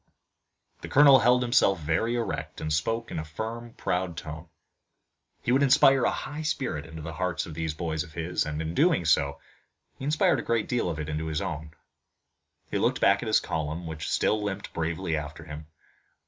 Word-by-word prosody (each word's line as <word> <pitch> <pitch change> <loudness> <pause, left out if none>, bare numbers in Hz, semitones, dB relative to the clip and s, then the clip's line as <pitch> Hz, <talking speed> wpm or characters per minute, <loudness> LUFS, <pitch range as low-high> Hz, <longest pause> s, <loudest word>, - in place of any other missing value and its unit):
The - - -6
colonel 140 -1 +7
held 125 +2 +4
himself 120 -5 +3
very 80 +10 0
erect, 115 -4 -3
and 80 0 -2
spoke 115 +9 -1
in - - -3
a - - -3
firm 115 +9 -6
proud 90 -2 -2
tone. 80 +2 -7 1.0
He 120 - 0
would 135 +2 +4
inspire 135 -1 +5
a - - +4
high 145 +3 -5
spirit 130 - -2
into 80 -1 -9
the 80 +1 -6
hearts 90 0 -2
of 80 - -8
these 80 -1 -3
boys 80 -2 -2
of 80 - -14
his, 85 +2 -1
and 75 0 -3
in 80 +1 -4
doing 155 - +3
so 70 -3 +2 0.6
he - - -8
inspired 150 +2 +3
a - - -2
great 115 -2 0
deal 120 -7 0
of 80 - -3
it 75 - -4
into 80 +1 -3
his 80 -1 -1
own. 80 -4 -5 1.0
He - - 0
looked - - +1
back - - +4
at - - -4
his - - +4
column, 80 +2 -3
which 80 -2 -5
still 110 - +1
limped 100 -1 -4
bravely 80 0 -2
after 75 +1 -5
him. 75 -1 -9
85 Hz, 195 wpm, -27 LUFS, 80-115 Hz, 1.0 s, colonel